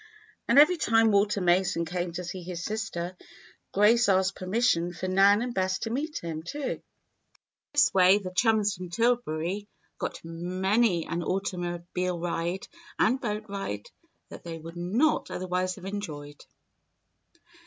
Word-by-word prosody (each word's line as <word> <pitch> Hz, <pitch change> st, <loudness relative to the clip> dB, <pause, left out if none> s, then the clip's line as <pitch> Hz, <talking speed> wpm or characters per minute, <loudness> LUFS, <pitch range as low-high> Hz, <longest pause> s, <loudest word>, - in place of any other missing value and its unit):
And -, -, +3 dB
every 315 Hz, +5 st, +7 dB
time 225 Hz, -6 st, +3 dB
Walter 200 Hz, 0 st, +2 dB
Mason 180 Hz, -1 st, +2 dB
came 175 Hz, +1 st, -3 dB
to 180 Hz, -, -4 dB
see 180 Hz, +1 st, -6 dB
his 175 Hz, -1 st, -6 dB
sister, 200 Hz, -5 st, -3 dB, 0.6 s
Grace 210 Hz, +3 st, +4 dB
asked 190 Hz, 0 st, +2 dB
permission 185 Hz, -3 st, +1 dB
for 180 Hz, +2 st, -4 dB
Nan 200 Hz, +3 st, +5 dB
and 245 Hz, -1 st, -4 dB
Bess 190 Hz, -1 st, 0 dB
to 225 Hz, -, -4 dB
meet 295 Hz, +5 st, -2 dB
him, 160 Hz, -2 st, -4 dB
too. 175 Hz, -, -7 dB
In -, -, -3 dB, 0.9 s
this 290 Hz, -1 st, +4 dB
way 185 Hz, +1 st, +6 dB
the 185 Hz, -3 st, -6 dB
chums 215 Hz, -1 st, +3 dB
from 180 Hz, -1 st, -7 dB
Tillbury 205 Hz, -3 st, 0 dB, 0.3 s
got -, -, -5 dB
many 185 Hz, +3 st, +1 dB
an 170 Hz, +1 st, -3 dB
automobile 180 Hz, -1 st, -2 dB
ride 175 Hz, +2 st, -2 dB, 0.3 s
and 255 Hz, +4 st, +2 dB
boat 215 Hz, -3 st, -3 dB
ride 195 Hz, -, -5 dB, 0.4 s
that -, -, -10 dB
they 165 Hz, -1 st, -6 dB
would 165 Hz, +1 st, -10 dB
not 210 Hz, -, +1 dB
otherwise 185 Hz, 0 st, -2 dB
have 190 Hz, -, -11 dB
enjoyed. 150 Hz, -8 st, -6 dB
185 Hz, 145 wpm, -28 LUFS, 175-215 Hz, 0.9 s, every